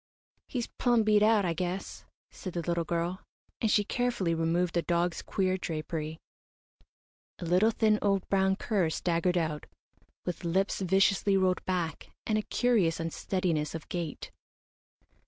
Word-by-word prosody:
"He's 245 -3 -2
plumb 240 -3 +1
beat 210 -1 +4
out, 215 -2 +4
I 170 - +1
guess," 180 +3 -4 0.3
said 185 - -7
the 170 - -2
little 170 0 0
girl, 170 +2 -2 0.4
and 225 - +2
she 205 0 +4
carefully 235 -6 0
removed 165 +2 +1
the 170 - +2
dog's 170 0 0
queer 185 -1 0
drapery. 155 -1 -4 1.2
A 175 - -6
little, 180 +6 +4
thin, 215 -1 +2
old, 195 -2 +1
brown 190 -1 +2
cur 195 -5 0
staggered 175 +2 0
out, 155 -3 -2 0.6
with 180 0 -4
lips 190 +4 0
viciously 195 +1 +3
rolled 185 -1 +1
back, 175 -4 -2 0.2
and 215 -1 +1
a - - 0
curious 210 -9 +1
unsteadiness 165 -1 -1
of 165 - -7
gait. 170 -4 -4
180 Hz, 145 wpm, -29 LUFS, 170-200 Hz, 1.2 s, beat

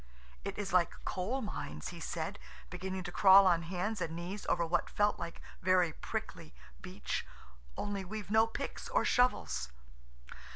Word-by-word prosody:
"It - - -4
is 195 -3 -3
like 175 -2 +2
coal 220 +9 -1
mines," 75 - -5
he - - -8
said, - - -4 0.3
beginning 185 +1 -4
to 175 - -5
crawl 195 +1 +8
on 175 -3 +4
hands 185 +5 -2
and 165 -1 -2
knees 180 +4 -5
over 170 - +2
what 170 +2 0
felt 205 0 +2
like 170 0 -6 0.2
very 185 -3 +3
prickly - - -5 0.3
beach, - - -3 0.5
"only 205 -1 -2
we've 205 +1 -6
no 220 +1 +5
picks 225 - -5
or - - +2
shovels." 245 - +2
185 Hz, 155 wpm, -33 LUFS, 175-205 Hz, 0.5 s, crawl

